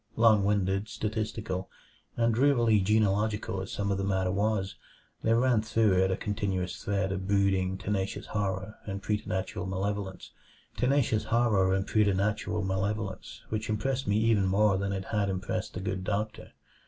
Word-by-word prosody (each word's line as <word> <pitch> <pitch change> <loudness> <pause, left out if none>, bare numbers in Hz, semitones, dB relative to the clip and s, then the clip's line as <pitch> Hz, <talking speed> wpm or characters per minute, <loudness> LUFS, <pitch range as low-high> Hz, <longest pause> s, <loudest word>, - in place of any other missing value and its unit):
Long 110 -3 +5
winded, 100 0 +1
statistical, 105 -3 -3 0.5
and 115 -1 +3
drearily 120 -4 +4
genealogical 105 0 +1
as 95 - -6
some 100 -1 -1
of 100 - 0
the - - -1
matter 95 -2 0
was, 100 0 0 0.5
there 115 +1 +3
ran 120 -2 +3
through 110 -2 +2
it 95 - +1
a 95 - 0
continuous 95 -4 -2
thread 100 -1 0
of 95 0 -3
brooding, 95 -2 +2
tenacious 100 +1 -2
horror 100 0 -3
and 100 0 -4
preternatural 95 -3 -2
malevolence 95 0 -3 0.5
which 105 -3 0
impressed 130 +5 -1
me 100 - +2
even 110 -3 +3
more 100 0 +3
than 100 0 -1
it 95 -1 -3
had 105 -2 0
impressed 95 -1 -3
the - - -3
good 95 0 -3
doctor. 105 +2 -3
100 Hz, 135 wpm, -29 LUFS, 95-110 Hz, 0.5 s, Long